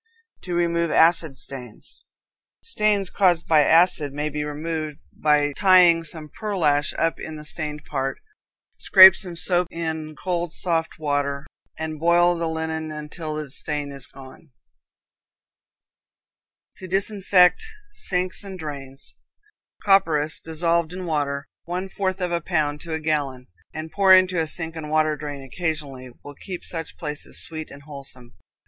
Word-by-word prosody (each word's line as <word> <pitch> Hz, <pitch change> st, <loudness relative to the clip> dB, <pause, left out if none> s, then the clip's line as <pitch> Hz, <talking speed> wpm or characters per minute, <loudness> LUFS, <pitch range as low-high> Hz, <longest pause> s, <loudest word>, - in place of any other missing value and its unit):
To 180 Hz, -1 st, -4 dB
Remove 170 Hz, -1 st, +1 dB
Acid 160 Hz, -4 st, +3 dB
Stains. 125 Hz, -5 st, -9 dB, 0.6 s
Stains 210 Hz, -, +1 dB
caused 175 Hz, -4 st, +2 dB
by 160 Hz, -2 st, +5 dB
acids 160 Hz, -2 st, +4 dB
may 150 Hz, +1 st, -1 dB
be 150 Hz, 0 st, -3 dB
removed 155 Hz, 0 st, -4 dB, 0.2 s
by 145 Hz, -1 st, +2 dB
tying 180 Hz, -4 st, +6 dB
some 155 Hz, -1 st, -7 dB
pearlash 155 Hz, -7 st, 0 dB
up 165 Hz, 0 st, 0 dB
in 160 Hz, -, -7 dB
the 150 Hz, 0 st, -9 dB
stained 150 Hz, -1 st, -4 dB
part; 135 Hz, -2 st, -3 dB, 0.6 s
scrape 190 Hz, -2 st, +9 dB
some 180 Hz, -2 st, -3 dB
soap 175 Hz, +1 st, +1 dB
in 160 Hz, -2 st, -4 dB
cold, 175 Hz, -2 st, -3 dB
soft 165 Hz, -2 st, -1 dB
water, 145 Hz, -2 st, -1 dB, 0.3 s
and 155 Hz, -1 st, -5 dB
boil 175 Hz, +2 st, +4 dB
the 165 Hz, -1 st, -2 dB
linen 160 Hz, -1 st, -3 dB
until 155 Hz, +1 st, -6 dB
the 150 Hz, -3 st, -5 dB
stain 145 Hz, 0 st, -3 dB
is 140 Hz, -2 st, -5 dB
gone. 135 Hz, +3 st, -14 dB, 2.3 s
To 185 Hz, -, -9 dB
Disinfect 195 Hz, -, +3 dB, 0.3 s
Sinks 185 Hz, -, -2 dB
and 195 Hz, -2 st, -8 dB
Drains. 140 Hz, -4 st, -8 dB, 0.7 s
Copperas 160 Hz, -7 st, +3 dB
dissolved 165 Hz, +1 st, 0 dB
in 185 Hz, 0 st, -6 dB
water, 145 Hz, -3 st, -2 dB, 0.2 s
one 180 Hz, +2 st, -4 dB
fourth 190 Hz, -1 st, -2 dB
of 180 Hz, -1 st, -1 dB
a 170 Hz, 0 st, 0 dB
pound 150 Hz, -1 st, -1 dB
to 165 Hz, -2 st, -6 dB
a 160 Hz, -, -1 dB
gallon, 145 Hz, -5 st, -2 dB, 0.3 s
and 155 Hz, +1 st, -7 dB
poured 190 Hz, -2 st, +7 dB
into 185 Hz, -1 st, +2 dB
a 160 Hz, -, -2 dB
sink 165 Hz, +1 st, -2 dB
and 155 Hz, -2 st, -6 dB
water 155 Hz, 0 st, +2 dB
drain 145 Hz, -2 st, -7 dB
occasionally, 140 Hz, -3 st, -4 dB
will 145 Hz, -, -9 dB
keep 180 Hz, +4 st, -8 dB
such 165 Hz, -2 st, -6 dB
places 150 Hz, -2 st, -5 dB
sweet 155 Hz, -1 st, -7 dB
and 140 Hz, 0 st, -13 dB
wholesome. 135 Hz, -4 st, -9 dB
160 Hz, 145 wpm, -23 LUFS, 150-175 Hz, 2.3 s, scrape